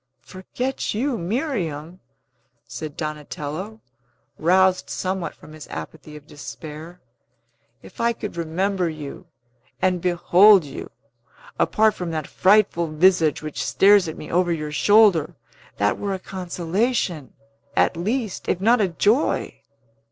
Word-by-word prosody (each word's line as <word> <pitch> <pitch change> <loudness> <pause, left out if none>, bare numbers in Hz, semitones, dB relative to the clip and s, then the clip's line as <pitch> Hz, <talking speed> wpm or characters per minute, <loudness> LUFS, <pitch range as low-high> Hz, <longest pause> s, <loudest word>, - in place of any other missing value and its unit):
"Forget 245 +7 -4
you, 260 +4 0
Miriam!" 180 - -3 0.7
said 155 -2 -7
Donatello, 155 +6 -6 0.6
roused 185 +2 +3
somewhat 185 -1 -3
from 155 - -15
his 155 -1 -11
apathy 80 - -9
of 150 -1 -12
despair. 155 +3 -10 0.8
"If - - -10
I 235 0 +3
could 215 -4 -6
remember 175 +2 -1
you, 150 -3 -8 0.5
and 180 -2 +1
behold 180 +2 +5
you, 140 - -8 0.7
apart 220 0 +3
from 180 -2 -5
that 155 -2 -3
frightful 190 -4 +3
visage 160 -1 +2
which 155 -1 -4
stares 200 -2 +4
at 160 - -6
me - - -9
over 175 0 +2
your 155 -2 -3
shoulder, 180 -3 +4 0.4
that 100 0 +1
were 200 -1 -2
a - - -4
consolation, 180 - -2 0.4
at - - +3
least, 215 +4 -3
if 180 - +1
not 225 +4 +3
a 200 - +3
joy." 210 - +1
180 Hz, 125 wpm, -22 LUFS, 155-205 Hz, 0.8 s, behold